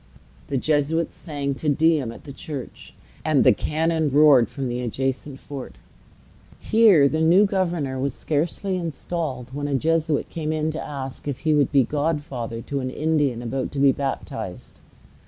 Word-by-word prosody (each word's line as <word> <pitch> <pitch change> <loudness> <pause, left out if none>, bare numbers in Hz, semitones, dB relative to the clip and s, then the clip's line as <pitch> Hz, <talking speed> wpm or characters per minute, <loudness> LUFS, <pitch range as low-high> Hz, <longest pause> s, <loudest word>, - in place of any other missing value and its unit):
The 140 - -1
Jesuits 155 +4 +1
sang 145 -4 -4
Te 150 +3 -2
Deum 155 -4 +2
at - - -12
the 140 - -9
church, 145 -4 -8 0.3
and - - +3
the - - +6
cannon 160 0 0
roared 140 -4 +6
from 135 -2 -4
the 120 0 -3
adjacent 135 +3 -3
fort. 135 - -8 0.8
Here 210 -10 +5
the 155 +3 -1
new 175 +6 +6
governor 170 -9 -1
was 140 +1 -2
scarcely 170 +5 -1
installed, 155 -6 -4
when 145 +1 -3
a 140 - 0
Jesuit 160 +1 +1
came 155 -2 -3
in 155 0 0
to 155 - -5
ask 135 -1 -7
if 135 -2 -3
he 155 - +2
would 145 -2 +2
be 140 -2 +5
godfather 140 -6 -3
to 140 +3 -3
an 130 -1 -3
Indian 145 -4 0
about 130 +2 -3
to - - -6
be 140 0 +6
baptized. 135 0 -5
145 Hz, 165 wpm, -23 LUFS, 135-160 Hz, 0.8 s, the